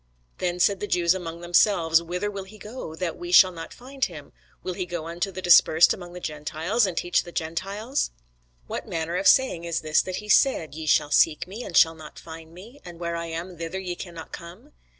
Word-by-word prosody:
Then 180 -1 -2
said 195 +2 +3
the 205 - -4
Jews 175 -2 +2
among 170 -2 -6
themselves, 175 -2 +3
Whither 180 +4 -3
will 195 -1 -6
he 210 +3 -14
go, 210 -6 -8
that 175 0 -4
we 350 0 -6
shall 190 - +7
not 165 -2 -9
find 265 +2 -8
him? 150 -5 -10 0.3
will 185 - -3
he 180 0 -4
go 175 -2 -5
unto 170 +4 -3
the 185 0 -8
dispersed 170 -1 +6
among 175 -1 -10
the 180 - -7
Gentiles, 155 +7 -1
and 175 -3 -5
teach 175 - +1
the 175 - -11
Gentiles? 195 - -3 0.6
What - - -6
manner 165 +1 -3
of 190 - +1
saying 260 -11 +4
is 170 -1 -2
this 155 0 +2
that 185 - -5
he 210 - -7
said, 200 - +3
Ye 160 +1 -7
shall 145 0 +3
seek 150 +1 +3
me, 205 +7 -8
and 170 - -2
shall 165 - +6
not 155 -2 -12
find 160 0 -11
me: 215 +11 -14
and 175 -1 -11
where 170 -1 -3
I 170 0 -4
am, 170 +1 -6
thither 165 +2 -4
ye 185 -2 -4
cannot 170 -2 -9
come? 185 - -11
175 Hz, 220 wpm, -25 LUFS, 165-190 Hz, 0.6 s, shall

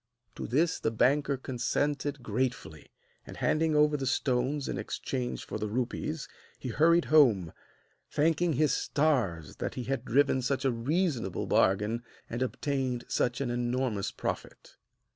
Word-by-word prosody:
To - - -6
this 160 +7 +1
the - - 0
banker 140 +5 +2
consented 140 +2 -2
gratefully; 115 - -3 0.4
and - - -9
handing 160 0 +1
over 150 0 +4
the 135 -2 -2
stones 130 +2 0
in - - -3
exchange 125 -2 -4
for - - -5
the 105 - -2
rupees, 130 +7 -3 0.3
he 130 - -6
hurried 170 +7 +4
home, 110 - +5 0.6
thanking 165 +2 +2
his 145 -1 +2
stars 125 - 0
that - - -4
he 125 - -3
had 135 +2 -2
driven 135 +1 +3
such 135 +2 -1
a 135 - +3
reasonable 125 - -1
bargain 105 +5 +2 0.3
and 120 +2 -3
obtained 130 -2 -1
such 120 +2 0
an 125 -3 -1
enormous 120 -3 -1
profit. - - -6
130 Hz, 145 wpm, -30 LUFS, 120-145 Hz, 0.6 s, home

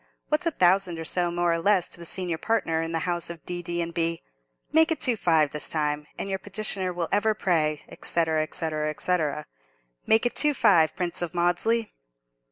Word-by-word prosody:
What's 305 +3 0
a - - +2
thousand 185 - +2
or 160 - -6
so, 175 +2 0
more 175 0 0
or 165 - -1
less, 190 0 +3
to - - -5
the 170 - -5
senior 175 -3 -1
partner 165 -8 0
in 165 0 -4
the 165 -1 -1
house 175 -2 0
of 170 -2 -9
D., 175 0 -4
D., 175 0 -2
and 170 0 -7
B.? 165 0 -1 0.5
Make 320 +1 +4
it 320 - -1
two 250 -6 +2
five 160 -7 +2
this 150 - 0
time, 150 -1 -1
and - - -4
your 190 -1 -3
petitioner 195 -2 -2
will 175 -2 -3
ever 215 +1 +2
pray, 155 -7 0 0.2
&c. 170 -1 +4 0.3
&c. 165 - 0 0.3
&c. 180 0 +2 0.9
Make 220 +2 +3
it 240 - -1
two 300 -1 +3
five, 160 - +4
Prince 175 -2 -2
of 175 0 -4
Maudesley!" 175 +7 +1
175 Hz, 200 wpm, -25 LUFS, 165-200 Hz, 0.9 s, Make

